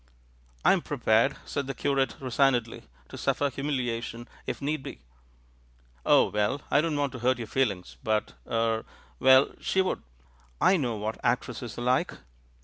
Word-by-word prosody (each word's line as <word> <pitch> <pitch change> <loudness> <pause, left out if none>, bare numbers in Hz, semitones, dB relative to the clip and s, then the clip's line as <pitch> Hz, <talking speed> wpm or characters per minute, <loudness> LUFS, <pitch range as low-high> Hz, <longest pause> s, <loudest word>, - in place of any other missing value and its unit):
"I - - +7
am - - +1
prepared," - - +2
said 140 -1 -3
the 135 - -4
curate 135 -4 0
resignedly, 125 -2 +1 0.2
"to - - -9
suffer 145 -1 +1
humiliation 120 -4 -3 0.2
if - - -3
need 150 +1 -2
be." - - -9 1.1
"Oh, - - +5
well, 105 +6 0
I 145 - +5
don't 155 -2 -1
want 145 -2 0
to 125 - -7
hurt 130 +1 +2
your 120 - -5
feelings. 100 - -1
But 110 -1 0
— - - -29
er 115 -1 0 0.2
— - - -30
well, 130 +1 +6
she 190 - 0
would! 190 - +1 0.6
I 195 - +5
know 125 -9 0
what 110 +2 -4
act 120 +1 +2
resses 120 -2 -7
are 120 - -4
like." 125 +1 +1
125 Hz, 170 wpm, -28 LUFS, 115-140 Hz, 1.1 s, I